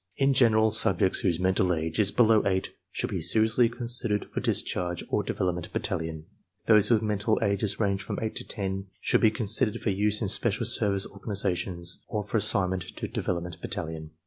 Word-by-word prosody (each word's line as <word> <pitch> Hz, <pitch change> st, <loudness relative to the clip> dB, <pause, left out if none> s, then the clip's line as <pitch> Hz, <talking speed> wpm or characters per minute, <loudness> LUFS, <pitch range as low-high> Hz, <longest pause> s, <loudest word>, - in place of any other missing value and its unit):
In 135 Hz, 0 st, +3 dB
general, 110 Hz, -4 st, +4 dB
subjects 105 Hz, -3 st, +2 dB
whose 90 Hz, -4 st, 0 dB
menial 95 Hz, 0 st, +2 dB
age 80 Hz, +2 st, -3 dB
is 100 Hz, -2 st, +4 dB
below 110 Hz, 0 st, +4 dB
eight 95 Hz, -1 st, -1 dB, 0.2 s
should -, -, -3 dB
be -, -, -2 dB
seriously 110 Hz, +7 st, +3 dB
con 120 Hz, +1 st, -7 dB
sidered 115 Hz, -4 st, 0 dB
for -, -, -2 dB
discharge 90 Hz, -1 st, -1 dB
or -, -, +1 dB
Development 90 Hz, -2 st, -3 dB
Battalion, 80 Hz, -1 st, -3 dB, 0.4 s
Those 105 Hz, -2 st, +5 dB
whose 110 Hz, -1 st, +3 dB
mental 105 Hz, +1 st, 0 dB
ages 100 Hz, 0 st, 0 dB
range 100 Hz, -2 st, 0 dB
from -, -, -5 dB
eight 110 Hz, -1 st, -3 dB
to -, -, -4 dB
ten 95 Hz, -2 st, -4 dB
should -, -, +2 dB
be 110 Hz, -, +6 dB
considered 105 Hz, -1 st, 0 dB
for 105 Hz, -, -1 dB
use 105 Hz, +2 st, 0 dB
in 110 Hz, -, -1 dB
special 110 Hz, +3 st, 0 dB
service 105 Hz, -4 st, +1 dB
organizations 95 Hz, -4 st, -1 dB
or 105 Hz, -1 st, -3 dB
for 105 Hz, +3 st, -2 dB
assignment 95 Hz, -3 st, +1 dB
to -, -, -4 dB
Development 85 Hz, -1 st, -4 dB
Battalion. 80 Hz, -7 st, -5 dB
100 Hz, 180 wpm, -27 LUFS, 90-110 Hz, 0.4 s, be